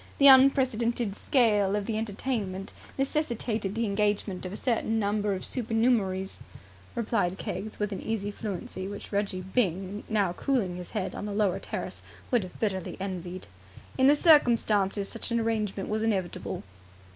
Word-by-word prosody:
The 280 Hz, -, +4 dB
unprecedented 250 Hz, -5 st, +5 dB
scale 210 Hz, -7 st, +3 dB
of 205 Hz, -1 st, -1 dB
the 225 Hz, -, -2 dB
entertainment 205 Hz, -3 st, -3 dB, 0.2 s
necessitated 235 Hz, -8 st, -1 dB
the 230 Hz, 0 st, 0 dB
engagement 200 Hz, -2 st, 0 dB
of -, -, -7 dB
a 205 Hz, -, -5 dB
certain 225 Hz, -2 st, 0 dB
number 205 Hz, -1 st, +1 dB
of 185 Hz, -, -6 dB
supernumeraries," 225 Hz, -5 st, 0 dB, 0.6 s
replied 215 Hz, -6 st, 0 dB
Keggs 215 Hz, +2 st, -5 dB
with 210 Hz, 0 st, -2 dB
an 195 Hz, -, -4 dB
easy 210 Hz, -2 st, -2 dB
fluency 190 Hz, -2 st, -5 dB
which 205 Hz, 0 st, -8 dB
Reggie 200 Hz, -2 st, -1 dB
Byng, 190 Hz, 0 st, -1 dB
now 200 Hz, -5 st, +1 dB
cooling 205 Hz, -8 st, 0 dB
his 180 Hz, -1 st, -8 dB
head 190 Hz, -2 st, -2 dB
on 205 Hz, -, -5 dB
the 205 Hz, -, -4 dB
lower 200 Hz, -3 st, +2 dB
terrace, -, -, -5 dB, 0.3 s
would 245 Hz, -3 st, +4 dB
have 185 Hz, -2 st, -9 dB
bitterly 190 Hz, -5 st, -2 dB
envied. 185 Hz, -1 st, -5 dB, 0.5 s
"In 260 Hz, 0 st, +4 dB
the 290 Hz, -, +7 dB
circumstances, 225 Hz, -, +4 dB
such 230 Hz, -, -3 dB
an 235 Hz, 0 st, +1 dB
arrangement 215 Hz, -4 st, -1 dB
was 215 Hz, +1 st, -1 dB
inevitable." 185 Hz, -, -2 dB
210 Hz, 155 wpm, -28 LUFS, 195-230 Hz, 0.6 s, the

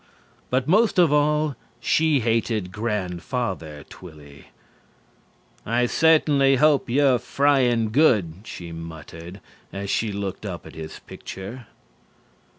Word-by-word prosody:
But 130 Hz, +1 st, 0 dB
most 210 Hz, +6 st, +3 dB
of 170 Hz, -5 st, +5 dB
all 150 Hz, 0 st, +2 dB, 0.2 s
she 155 Hz, -4 st, +2 dB
hated 110 Hz, -4 st, 0 dB
Grandfather 95 Hz, -, -3 dB
Twilly. 75 Hz, -5 st, -14 dB, 1.2 s
"I 120 Hz, +2 st, +1 dB
certainly 145 Hz, -1 st, +4 dB
hope 145 Hz, -1 st, +3 dB
you're 130 Hz, 0 st, +3 dB
frying 125 Hz, -6 st, +2 dB
good," 110 Hz, -, +3 dB
she 85 Hz, -5 st, -8 dB
muttered 80 Hz, +2 st, -9 dB, 0.3 s
as 100 Hz, 0 st, -4 dB
she 110 Hz, -2 st, 0 dB
looked 100 Hz, -1 st, -5 dB
up 90 Hz, -6 st, -6 dB
at -, -, -11 dB
his 80 Hz, 0 st, -8 dB
picture. 105 Hz, +5 st, -9 dB
115 Hz, 110 wpm, -23 LUFS, 90-140 Hz, 1.2 s, of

